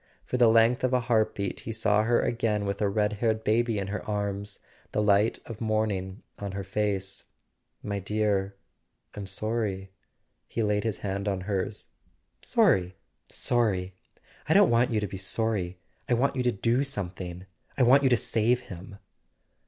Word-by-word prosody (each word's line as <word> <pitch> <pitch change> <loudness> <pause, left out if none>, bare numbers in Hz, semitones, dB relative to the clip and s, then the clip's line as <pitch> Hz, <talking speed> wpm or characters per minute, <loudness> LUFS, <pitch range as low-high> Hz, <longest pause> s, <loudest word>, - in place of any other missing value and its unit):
For 125 - -2
the 120 -2 +6
length 115 +3 +4
of 130 0 +1
a 125 - +4
heart 115 -3 +1
beat 100 -2 -3
he 115 - -6
saw 105 -1 +2
her 120 +2 +2
again 110 -3 0
with 100 +1 -3
a 105 - +2
red 105 +1 +1
haired 110 -1 +1
baby 115 +1 +1
in 100 - -1
her 105 - -4
arms, 100 -1 -3 0.4
the - - +1
light 105 +2 +3
of 115 -1 -9
morning 105 -4 -1 0.2
on 100 -2 -5
her 100 0 -4
face. 100 0 -2 0.6
"My 100 -1 -2
dear—I'm 100 0 -4
sorry." 100 -2 -2 0.6
He 115 - -2
laid 105 0 0
his 110 -3 -1
hand 100 +1 -2
on 95 -2 -1
hers. 95 -1 -3 0.3
" - - -46 0.2
Sorry—sorry? 95 +2 0 0.6
I - - +4
don't - - +6
want 120 +1 +3
you 110 - +1
to 105 - -1
be 95 - -7
sorry. 95 -2 -1 0.3
I 120 - +4
want 135 +4 +1
you 130 - 0
to 125 -1 +2
do 115 +5 +1
something—I 95 -2 -5
want 130 +3 +6
you 135 - +3
to 120 - +4
save 120 +3 +1
him!" 100 -3 -10
105 Hz, 170 wpm, -27 LUFS, 100-115 Hz, 0.6 s, the